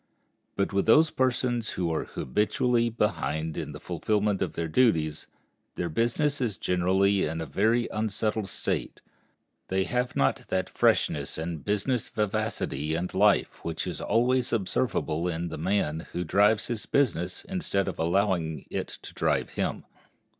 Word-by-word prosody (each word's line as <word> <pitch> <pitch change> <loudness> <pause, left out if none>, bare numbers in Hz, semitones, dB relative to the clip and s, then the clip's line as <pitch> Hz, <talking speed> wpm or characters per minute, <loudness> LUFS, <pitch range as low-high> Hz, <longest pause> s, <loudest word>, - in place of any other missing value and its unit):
But 100 0 -1
with 100 +2 +1
those 155 +8 +6
persons 125 -3 0
who 85 -3 0
are 80 - -1
habitually 115 - +1
behind 80 -8 -1
in - - -4
the - - -8
fulfillment 105 -2 0
of - - -1
their 85 0 -2
duties, 80 -6 +2 0.5
their 85 - -2
business 125 - 0
is 110 -7 -1
generally 95 +2 +2
in 80 +2 -3
a 80 - -3
very 115 +7 +2
unsettled 110 -1 -1
state. - - -3 0.7
They 95 0 +1
have 125 +4 -1
not 70 - +1
that 95 -1 -1
freshness - - +1
and 80 -1 -4
business 105 +4 0
vivacity 80 -7 -1
and 90 +2 -3
life 100 +1 +2
which 80 -1 -3
is - - -5
always 125 +2 +2
observable 95 -6 0
in 85 0 -2
the 80 - -6
man 80 -3 0
who 90 - -1
drives 105 +5 +3
his 120 -2 -3
business 115 -11 0
instead 170 - -1
of - - -4
allowing 85 -2 0
it - - -2 0.2
to - - -9
drive - - 0
him. - - -2
100 Hz, 150 wpm, -27 LUFS, 85-115 Hz, 0.7 s, those